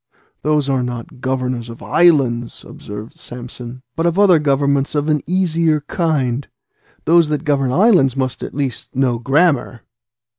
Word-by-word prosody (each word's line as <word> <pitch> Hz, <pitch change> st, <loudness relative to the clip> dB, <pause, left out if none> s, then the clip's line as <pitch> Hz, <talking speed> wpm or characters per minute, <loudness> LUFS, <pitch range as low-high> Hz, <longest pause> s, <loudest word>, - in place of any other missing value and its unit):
"Those 150 Hz, -2 st, +1 dB
are 135 Hz, -2 st, +1 dB
not 125 Hz, 0 st, -6 dB
governors 130 Hz, -2 st, -2 dB
of 115 Hz, -, -10 dB
islands," 130 Hz, -9 st, +2 dB
observed 105 Hz, +2 st, -10 dB
Samson, 125 Hz, 0 st, -9 dB
"but 165 Hz, +3 st, 0 dB
of 170 Hz, +1 st, 0 dB
other 195 Hz, -5 st, +5 dB
governments 140 Hz, 0 st, +1 dB
of 145 Hz, +1 st, 0 dB
an 150 Hz, -2 st, +1 dB
easier 165 Hz, -4 st, +1 dB
kind: 145 Hz, -5 st, -1 dB, 0.6 s
those 165 Hz, -1 st, +4 dB
that 150 Hz, -1 st, -2 dB
govern 140 Hz, -3 st, +1 dB
islands 175 Hz, -, +4 dB
must 130 Hz, -2 st, -2 dB
at -, -, -7 dB
least 130 Hz, -6 st, -4 dB
know 125 Hz, -3 st, +1 dB
grammar." 135 Hz, -2 st, +1 dB
140 Hz, 145 wpm, -18 LUFS, 125-155 Hz, 0.6 s, other